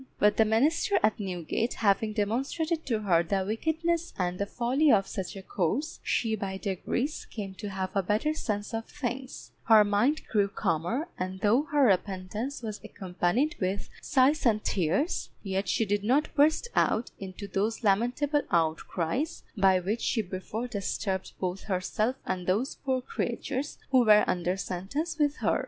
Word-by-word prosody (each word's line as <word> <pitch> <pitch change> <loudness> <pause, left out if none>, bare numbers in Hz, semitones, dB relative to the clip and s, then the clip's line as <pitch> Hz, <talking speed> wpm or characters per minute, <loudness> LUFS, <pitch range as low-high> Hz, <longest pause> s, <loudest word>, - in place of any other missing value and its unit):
But 210 0 +3
the 220 - +5
minister 280 - +2
at 215 +2 +2
Newgate 190 +4 -2
having 215 0 +2
demonstrated 275 - -1
to 225 -4 0
her 175 -5 +3
the 190 +3 0
wickedness 325 - -1
and 180 -1 -1
the 200 - -1
folly 260 +7 +2
of 195 -2 +4
such 190 +1 -5
a 195 - -8
course, 215 - -1
she 225 -2 0
by 195 -2 -4
degrees 225 - -2
came 200 -4 -6
to 210 - -4
have 190 -1 -3
a 195 - +3
better 215 +11 +1
sense 210 -9 -3
of 225 0 -2
things; 260 -2 -5
her 220 -2 +7
mind 210 +10 +2
grew 205 -2 +2
calmer, 200 - -1
and 185 +1 -4
though 235 +8 +3
her 295 -2 +4
repentance 200 +6 -1
was 215 -2 -5
accompanied 190 - -1
with 190 +1 -2
sighs 280 +4 +3
and 215 -5 +2
tears, 190 - 0
yet 195 -1 -2
she 225 - +2
did 205 0 0
not 265 +8 +2
burst 310 +9 +3
out 230 - +2
into 195 +1 -7
those 215 +4 -1
lamentable 245 +8 +2
outcries 170 - -1
by 190 -3 +4
which 205 +6 -2
she 225 - +1
before 195 +5 -5
disturbed 195 -3 -3
both 185 0 -3
herself 210 +5 0
and 180 -1 -3
those 215 +9 +1
poor 260 -2 -2
creatures 270 +2 -3
who 260 -2 +6
were 210 -2 +7
under 180 +1 0
sentence 275 - -3
with 295 -1 +2
her. - - +1
215 Hz, 165 wpm, -28 LUFS, 190-260 Hz, -, her